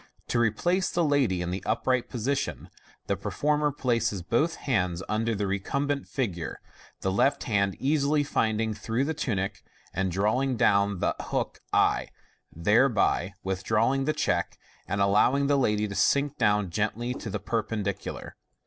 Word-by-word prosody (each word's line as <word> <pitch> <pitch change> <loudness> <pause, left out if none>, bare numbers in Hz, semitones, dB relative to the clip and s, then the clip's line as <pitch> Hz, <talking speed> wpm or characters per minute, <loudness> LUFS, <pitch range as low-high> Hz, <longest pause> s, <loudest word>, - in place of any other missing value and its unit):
To 120 - +1
replace 175 - +1
the 170 - +1
lady 135 - +2
in 90 - -3
the 95 +1 -3
upright 125 +3 0
position, 130 +4 -2 0.3
the - - 0
performer 150 0 0
places 115 -8 0
both 150 - +1
hands 90 -8 -1
under 115 +1 0
the 100 0 -1
recumbent 140 +9 -1
figure, 95 - -3 0.4
the 95 - 0
left 115 +9 +2
hand 100 -4 +1
easily 145 +1 +2
finding 110 -5 0
(through 115 +4 -1
the 160 - -1
tunic) 105 -11 -2 0.3
and 95 +1 -1
drawing 115 +8 +1
down 100 -3 +2
the - - +2
hook - - -3
t, - - +2 0.4
thereby 105 - +2
withdrawing 110 +8 +1
the 155 - +1
check, 85 -12 -1 0.3
and 100 - -1
allowing 105 +8 +3
the 145 +1 +3
lady 105 -5 +1
to 100 - -6
sink 140 +7 +2
down 105 -5 +2
gently 110 +5 -1
to 115 - -6
the - - -3
perpendicular. 105 -3 -3
110 Hz, 150 wpm, -27 LUFS, 100-135 Hz, 0.4 s, allowing